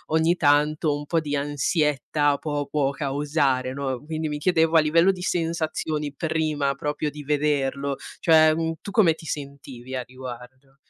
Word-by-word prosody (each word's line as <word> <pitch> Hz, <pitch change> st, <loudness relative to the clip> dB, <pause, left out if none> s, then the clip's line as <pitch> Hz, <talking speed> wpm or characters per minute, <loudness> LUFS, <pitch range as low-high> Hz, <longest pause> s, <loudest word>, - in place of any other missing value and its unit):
ogni 165 Hz, +2 st, +3 dB
tanto 150 Hz, +1 st, +2 dB
un 145 Hz, 0 st, -6 dB
po' 165 Hz, +2 st, +1 dB
di 145 Hz, -2 st, -3 dB
ansietta 145 Hz, 0 st, 0 dB
può 145 Hz, -2 st, -3 dB
può 140 Hz, -1 st, 0 dB
causare, 140 Hz, -2 st, 0 dB
no? 135 Hz, -2 st, -3 dB
Quindi 160 Hz, -1 st, -3 dB
mi 150 Hz, -, -3 dB
chiedevo 165 Hz, 0 st, +3 dB
a -, -, +8 dB
livello 165 Hz, +4 st, +4 dB
di 185 Hz, -2 st, -8 dB
sensazioni, 160 Hz, -4 st, -2 dB
prima 155 Hz, -3 st, -1 dB
proprio 150 Hz, +1 st, -2 dB
di 150 Hz, 0 st, -9 dB
vederlo, 140 Hz, -2 st, 0 dB, 0.2 s
cioè, 155 Hz, -1 st, +6 dB
mhmm 165 Hz, 0 st, -1 dB
tu -, -, -7 dB
come 175 Hz, -5 st, +4 dB
ti 160 Hz, -, -13 dB
sentivi 140 Hz, -4 st, -7 dB
a 130 Hz, -1 st, -2 dB
riguardo? 130 Hz, +2 st, -11 dB
150 Hz, 160 wpm, -24 LUFS, 140-160 Hz, 0.2 s, a